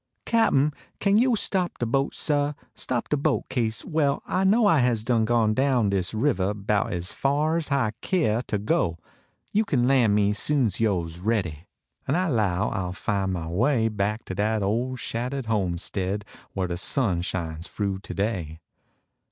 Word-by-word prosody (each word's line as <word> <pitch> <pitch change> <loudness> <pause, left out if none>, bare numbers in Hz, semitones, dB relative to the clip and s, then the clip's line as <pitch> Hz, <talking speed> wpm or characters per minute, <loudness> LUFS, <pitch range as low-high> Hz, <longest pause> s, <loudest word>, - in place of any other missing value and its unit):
Cap 230 -1 +3
n, 145 +2 +3 0.3
kain 200 0 +3
yo 245 +1 +4
stop 185 -4 -1
de 120 - -1
boat, 135 +4 0
sail? 145 -1 0 0.2
Stop 120 -2 -2
de 150 - +2
boat, 145 0 +1
kase 115 -4 -1
well 150 -4 0
I 185 - 0
know 215 +4 +4
I 165 -7 +5
has 120 -3 +1
done 115 -1 +2
gone 115 -2 +2
down 125 -4 +2
dis 95 -2 0
rivah 105 -5 0
Bout 105 +3 0
es 90 -1 -2
far 150 +4 +1
s 160 - -1
hi 135 -6 +1
keah 120 - +1
ter 105 - 0
go. 100 - 0 0.6
You 215 - +3
kin 125 - +1
Ian 120 -6 +4
me 105 0 +3
soon 140 +5 +1
s 100 -4 -1
vo 100 -7 +1
s 85 +1 -10
ready, 90 -6 -2 0.4
En 140 - +1
I 180 0 +1
low 105 - +1
I - - -2
ll 90 -1 -3
fin 95 -1 -1
mah 85 -3 -4
way 115 - +2
Back 105 +1 -2
to - - -5
dat 105 +2 0
ole 120 +6 0
shattah 125 +3 -3
d - - -15
homestead 95 0 -2 0.3
Whar 95 -1 0
de 85 -1 -3
sun 95 -3 +1
shines 85 -2 -4
froo 100 -2 -2
today. 95 -6 -3
110 Hz, 185 wpm, -25 LUFS, 95-140 Hz, 0.6 s, I